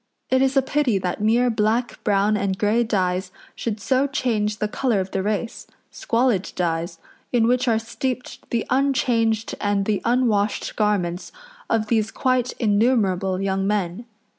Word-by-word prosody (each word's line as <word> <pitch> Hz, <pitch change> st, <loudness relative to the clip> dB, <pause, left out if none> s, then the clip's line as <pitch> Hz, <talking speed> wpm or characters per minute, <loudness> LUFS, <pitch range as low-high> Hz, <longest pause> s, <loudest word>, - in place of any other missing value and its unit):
It 260 Hz, 0 st, +4 dB
is 270 Hz, +1 st, +2 dB
a 270 Hz, -, +4 dB
pity 270 Hz, -5 st, +1 dB
that 185 Hz, +1 st, -3 dB
mere 235 Hz, +3 st, +3 dB
black, 225 Hz, +3 st, 0 dB
brown, 205 Hz, 0 st, +2 dB
and 195 Hz, -2 st, -1 dB
grey 220 Hz, +4 st, +2 dB
dyes 185 Hz, -4 st, -1 dB, 0.2 s
should 220 Hz, -2 st, -4 dB
so 260 Hz, +6 st, +1 dB
change 215 Hz, -6 st, -1 dB
the 210 Hz, -, -1 dB
colour 230 Hz, -1 st, 0 dB
of 190 Hz, 0 st, -4 dB
the 190 Hz, -, -1 dB
race 215 Hz, +4 st, -3 dB, 0.2 s
squalid 230 Hz, -5 st, 0 dB
dyes, 170 Hz, -1 st, -2 dB, 0.3 s
in 235 Hz, -2 st, +3 dB
which 250 Hz, +1 st, +2 dB
are 225 Hz, -2 st, +3 dB
steeped 250 Hz, +3 st, -5 dB
the 235 Hz, -2 st, -1 dB
unchanged 240 Hz, -5 st, +1 dB
and 205 Hz, -1 st, +1 dB
the 210 Hz, -1 st, 0 dB
unwashed 230 Hz, -4 st, +1 dB
garments 195 Hz, -4 st, -1 dB, 0.4 s
of 225 Hz, -1 st, +1 dB
these 220 Hz, -1 st, +1 dB
quite 255 Hz, 0 st, 0 dB
innumerable 205 Hz, -4 st, +1 dB
young 195 Hz, 0 st, -1 dB
men. 205 Hz, +1 st, -1 dB
215 Hz, 155 wpm, -22 LUFS, 195-245 Hz, 0.4 s, It